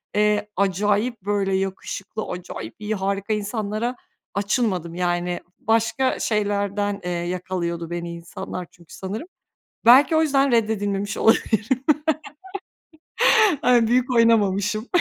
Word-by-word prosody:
eee, 210 0 +2
acayip 205 +4 0
böyle 195 -1 0
yakışıklı, 195 +2 -4
acayip 115 -10 -7
iyi, 215 0 -2
harika 200 +2 -1
insanlara 215 +3 -2 0.4
açılmadım. 200 -5 -1
Yani, 175 0 -1 0.2
başka 230 +4 +1
şeylerden, 205 -1 -1
eee, 180 - -3
yakalıyordu 175 -1 -3
beni 170 0 -4
insanlar, 170 +1 -7
çünkü, 170 -2 -18
sanırım. 205 - -5 0.6
Belki 275 +7 +7
o 315 - +4
yüzden 275 -3 +2
reddedilmemiş 205 -3 0
olabilirim. 220 0 +3 2.1
Yani, 240 -2 +4
büyük 250 +2 +2
oynamamışım. 215 -1 +2
205 Hz, 105 wpm, -23 LUFS, 185-225 Hz, 2.1 s, Belki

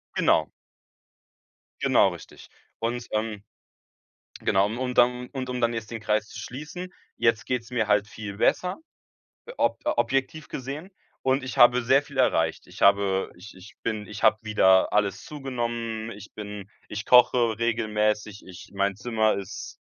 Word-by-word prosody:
Genau. - - +3 1.3
Genau - - +4
richtig. - - -12 0.3
Und, 120 +1 -3
ähm, 110 -1 -2 1.0
genau, 95 +1 +3
und 125 +4 -3
dann 125 0 +3
und 130 -2 -5
um 125 0 -3
dann 120 0 +2
jetzt 115 -1 -5
den 115 - -5
Kreis 110 0 0
zu - - -10
schließen, 160 +8 -7 0.2
jetzt 115 -2 +1
geht's 125 -1 -2
mir 115 -3 0
halt 105 0 +3
viel 105 -2 -7
besser, 180 - +1 0.8
ob - - +1
objektiv 155 - 0
gesehen 140 +8 -6 0.3
und 130 +1 +1
ich 130 +1 -6
habe 120 0 +7
sehr 135 +4 +4
viel 145 -1 -13
erreicht. 85 -10 +1
Ich - - -10
habe 100 -1 +3
ich 90 +5 -12
ich 95 +3 -14
bin 110 -3 -3
ich 105 -1 -8
hab 110 +1 +4
wieder 95 -3 +4
alles 105 -2 0
zugenommen. 120 -5 -4
Ich 100 0 -12
bin 105 -2 -7 0.2
ich 110 +1 -5
koche 120 -2 +5
regelmäßig. 105 -2 0
Ich 90 -1 -12
mein 100 0 0
Zimmer 110 -1 +1
ist 100 0 -7
115 Hz, 150 wpm, -26 LUFS, 105-125 Hz, 1.3 s, habe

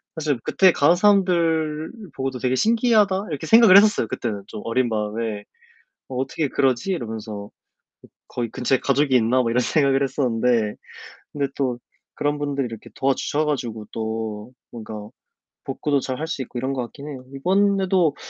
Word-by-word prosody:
사실 150 -6 -1
그때 190 -2 +4
가는 150 +5 +4
사람들 170 -5 +2 0.2
보고도 130 -1 -3
'되게 130 0 0
신기하다.' 215 - +2
이렇게 150 +2 -4
생각을 225 -2 +8
했었어요, 210 - +4
그때는 105 -4 -4
좀 - - -8
어린 120 +1 +1
마음에. 105 0 -3 0.7
'어 130 - -6
어떻게 135 +3 -1
그러지?' 130 +6 0
이러면서 110 - -5 0.8
'거기 120 -2 -4
근처에 130 +2 0
가족이 140 0 +1
있나?' 125 +2 +3
뭐 115 - -1
이런 120 +2 +2
생각을 135 +1 +2
했었는데 120 -5 0 0.6
근데 140 -1 -1
또 130 -3 -1 0.4
그런 145 0 -1
분들이 140 -2 -1
이렇게 115 -2 -9
도와주셔 135 +3 0
가지고 120 -7 -3
또 110 0 -4 0.2
뭔가 110 -2 -8 0.7
복구도 140 +1 0
잘할 130 +4 -3
수 160 - -4
있고 125 - -9
이런 130 +2 -2
것 130 - -2
같긴 140 +4 -10
해요. 130 -3 -8
이번에도 190 0 +2
135 Hz, 355 characters per minute, -22 LUFS, 115-160 Hz, 0.8 s, 생각을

